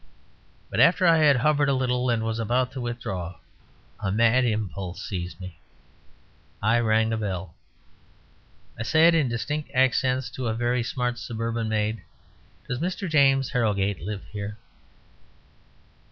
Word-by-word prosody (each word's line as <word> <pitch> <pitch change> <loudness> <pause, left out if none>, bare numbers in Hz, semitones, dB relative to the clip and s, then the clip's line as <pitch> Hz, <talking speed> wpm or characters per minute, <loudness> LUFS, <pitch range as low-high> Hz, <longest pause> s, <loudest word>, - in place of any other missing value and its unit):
But - - -2
after 180 +4 +5
I 165 -1 +6
had 150 -2 +5
hovered 145 +3 +2
a 140 - +2
little, 125 -1 0
and 115 -2 +1
was 115 0 -2
about 125 +3 0
to 130 -1 -6
withdraw, 95 -8 -4 0.6
a 100 - -2
mad 115 +4 +3
impulse 100 -5 -3
seized 90 -2 -5
me. 90 -2 -9 1.0
I 115 +3 +2
rang 110 -1 +2
the 110 - 0
bell. 95 -4 -4 1.3
I - - -3
said 160 +9 +5
in 155 -6 +2
distinct 140 +6 -3
accents 130 0 +2
to 130 -2 -4
a 110 - -1
very 120 +1 0
smart 120 0 -2
suburban 115 -1 -3
maid, 110 0 -1 0.7
"Does 125 - -3
Mr. 185 +4 -3
James 135 -4 +3
Harrogate 100 -5 0
live 100 -1 -5
here?" 105 0 -6
120 Hz, 140 wpm, -25 LUFS, 105-130 Hz, 1.3 s, I